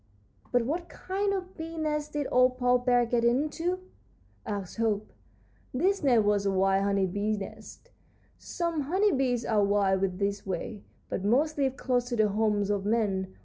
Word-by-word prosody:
"But 245 -2 +2
what 340 +6 -3
kind 395 +2 -2
of 375 -1 -4
bee's 325 +1 -7
nest 300 -1 -2
did 295 -1 -1
old 255 0 +4
Paw 250 0 +3
Bear 245 -1 +3
get 235 0 0
into?" 305 +9 +1 0.7
asked 200 -3 -4
Hope. 215 -2 -1 0.6
"This 385 +9 +1
nest 245 -7 +4
was 205 -1 +2
a - - +2
wild 195 +1 +2
honey 200 -1 +2
bee's 205 +3 -1
nest. 215 +2 -10 0.5
Some 335 -3 -2
honey 400 +4 +3
bees 255 -4 0
are 210 -2 +2
wild 195 -2 +1
this 200 0 -1
way, 195 +2 -4 0.3
but 190 - -3
most 280 +9 +2
live 270 -1 0
close 245 -1 0
to 245 - -1
the 215 -2 +3
homes 205 -1 +1
of 200 -1 -1
men. 200 -3 0
235 Hz, 170 wpm, -28 LUFS, 200-295 Hz, 0.7 s, old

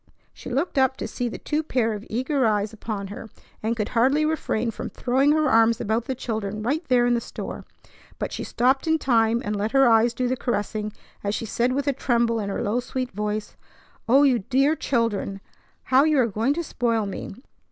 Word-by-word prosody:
She - - -9
looked 275 +4 0
up 265 0 +2
to - - -4
see 245 -1 -3
the - - -6
two 300 +1 -1
pairs 230 -8 0
of 205 - -12
eager 260 +4 0
eyes 210 0 0
upon 205 -3 -5
her, 215 +2 -8 0.3
and 225 +2 -1
could 210 -2 -1
hardly 270 +6 +3
refrain 245 -7 -1
from - - -6
throwing 265 +4 +2
her 310 -1 +2
arms 225 -1 +4
about 220 +2 -1
the 265 - -3
children 215 -3 -4
right 290 +9 0
there 245 -2 +4
in 245 - +3
the 235 - +1
store; - - -7 0.5
but - - -3
she - - -4
stopped 260 +5 +1
in 320 0 +3
time 235 -4 +2
and 210 +1 -1
let 210 +3 -2
her 270 -1 +6
eyes 230 +1 +4
do 255 - 0
the 255 - 0
caressing, 215 -3 -2 0.3
as 200 +1 -1
she - - -3
said 240 +3 0
with 280 +1 -2
a 280 - +3
tremble 235 -3 +1
in 200 -2 -3
her 195 - -2
low, 215 +4 0
sweet 255 0 -4
voice: 210 +1 -3 0.5
"O 270 +4 +6
you 260 -4 +4
dear 275 +9 +2
children! 230 -8 -1 0.4
How 260 +2 +4
you 310 -1 +3
are 255 - +4
going 230 +6 0
to 340 - -2
spoil 230 -7 0
me! 195 -1 -6
235 Hz, 215 wpm, -24 LUFS, 220-265 Hz, 0.5 s, her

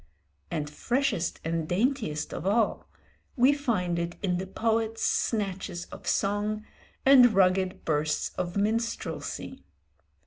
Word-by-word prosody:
And 150 -1 -2
freshest 225 - -1
and 165 -1 -2
daintiest 200 - 0
of - - -4
all, 215 +1 +1 0.5
we 255 +3 +5
find 205 -12 -1
it 170 0 -3
in 180 -2 +1
the 190 - -4
poet's 225 +2 -1
snatches 190 -5 -1
of - - -10
song 210 +2 0 0.4
and 250 -4 +7
rugged 185 -1 +2
bursts 150 -1 0
of 175 +2 -3
minstrelsy. 230 +3 -2
200 Hz, 115 wpm, -28 LUFS, 175-230 Hz, 0.5 s, and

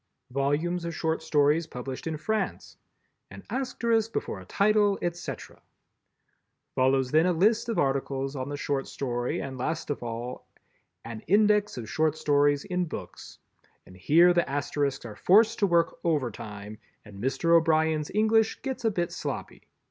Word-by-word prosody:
_" - - -16
Volumes 150 +6 0
of 170 -1 -4
Short 160 0 -1
Stories 150 +1 +2
published 130 +2 -6
in 160 -1 -2
France. 220 +7 -3 0.5
"An - - -11
Asterisk 235 -4 0
before 100 - -3
a 95 - -12
title, 205 - +2
etc." 175 0 -5 1.1
Follows 130 0 +2
then 160 +3 +4
a - - +3
list 215 +7 +2
of 225 - -1
articles 135 -2 -1
on 130 0 -4
the 145 - -4
Short 140 -2 -2
Story 120 -2 -3
and 135 -2 -6
last 155 +3 -2
of 145 - -4
all 120 +1 -6 0.6
An 115 -1 -6
Index 210 +1 +3
of 115 -3 -6
Short 155 +3 0
Stories 145 -1 +2
in 180 0 -1
Books, 100 - -9 0.5
and 90 - -15
here 165 - +5
the 175 -4 +1
Asterisks 140 -1 -2
are 110 -3 -8
forced 215 - +4
to 200 - +3
work 170 -2 +1
overtime 110 -9 -3 0.3
and 100 -2 -11
Mr. 165 +6 +2
O'Brien's 160 -2 +2
English 220 +1 +2
gets 265 -2 -4
a 225 - +3
bit 175 -5 -2
sloppy. - - -6
155 Hz, 155 wpm, -27 LUFS, 135-180 Hz, 1.1 s, here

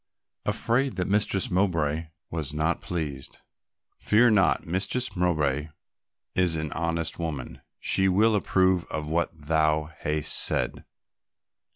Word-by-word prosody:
"Afraid 130 +4 0
that 90 - -2
Mistress 100 -1 0
Mowbray 85 -4 0 0.2
was 75 -3 -3
not 80 +3 0
pleased." 75 -6 -5 0.6
"Fear 115 +2 +4
not, 95 -4 +2
Mistress 100 +7 -2
Mowbray 75 -5 0 0.7
is 90 -3 +3
an 80 -2 -3
honest 85 0 -2
woman, 80 -6 -5 0.2
she 95 0 +2
will 110 +4 +3
approve 95 -3 +1
of 75 -1 -5
what 85 +1 +1
thou 75 0 0
hast 75 0 0
said." - - +4
85 Hz, 115 wpm, -26 LUFS, 75-95 Hz, 0.7 s, Fear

